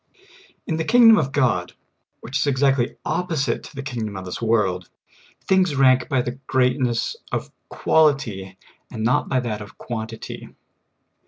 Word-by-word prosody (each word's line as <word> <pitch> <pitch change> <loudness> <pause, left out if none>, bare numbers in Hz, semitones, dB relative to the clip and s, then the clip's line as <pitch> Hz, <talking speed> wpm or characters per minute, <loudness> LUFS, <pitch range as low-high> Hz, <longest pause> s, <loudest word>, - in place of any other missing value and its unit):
IN 160 - -2
the 160 - -1
kingdom 225 +2 +7
of 135 -4 -1
God, 120 -11 +1 0.5
which 130 - -8
is 145 - 0
exactly 135 -1 +2
opposite 155 -9 -1
to - - -13
the 140 - -5
kingdom 110 -6 -4
of 95 - -7
this 90 - -6
world, 100 -6 0 0.5
things 185 -5 +2
rank 130 -2 +4
by 130 -3 +1
the 120 +2 -5
greatness 125 - +1 0.2
of - - -3 0.2
quality, 120 -12 +1 0.3
and 110 - -5
not 120 +3 +1
by 130 - +2
that 110 -4 -4
of 100 - -11
quantity. 110 -1 -7
125 Hz, 150 wpm, -22 LUFS, 110-140 Hz, 0.5 s, kingdom